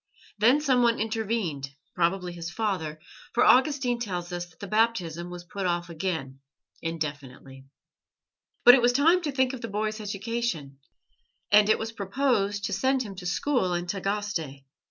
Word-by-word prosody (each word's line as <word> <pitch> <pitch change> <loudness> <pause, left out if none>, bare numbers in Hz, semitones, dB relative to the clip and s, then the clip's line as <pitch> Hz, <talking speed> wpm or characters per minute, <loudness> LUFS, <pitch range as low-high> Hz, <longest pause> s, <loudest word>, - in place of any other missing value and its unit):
Then 245 +8 +5
someone 245 -5 +3
intervened, 215 - -2 0.2
probably 180 0 0
his 170 -1 -6
father, 175 -6 -2 0.3
for 245 - +4
Augustine 255 -2 +4
tells 180 -6 -4
us 175 0 -4
that 170 - -25
the - - -6
Baptism 185 -6 0
was 175 0 -8
put 190 +2 -4
off 175 0 -2
again 155 -6 -4 0.4
indefinitely. 140 -4 -6 1.0
But 245 - +11
it 260 - +5
was 240 +1 +4
time 330 +7 +4
to 305 -4 -2
think 260 -1 +1
of 255 - -7
the 230 - -4
boy's 215 +1 -2
education, 205 - -3 0.7
and 210 0 +6
it - - +5
was 225 0 -4
proposed 205 -1 0
to - - -2
send 260 +6 +1
him 205 -4 -8
to 180 -1 -5
school 185 -2 0
in 175 0 -2
Tagaste. 195 -7 -3
200 Hz, 155 wpm, -27 LUFS, 175-235 Hz, 1.0 s, But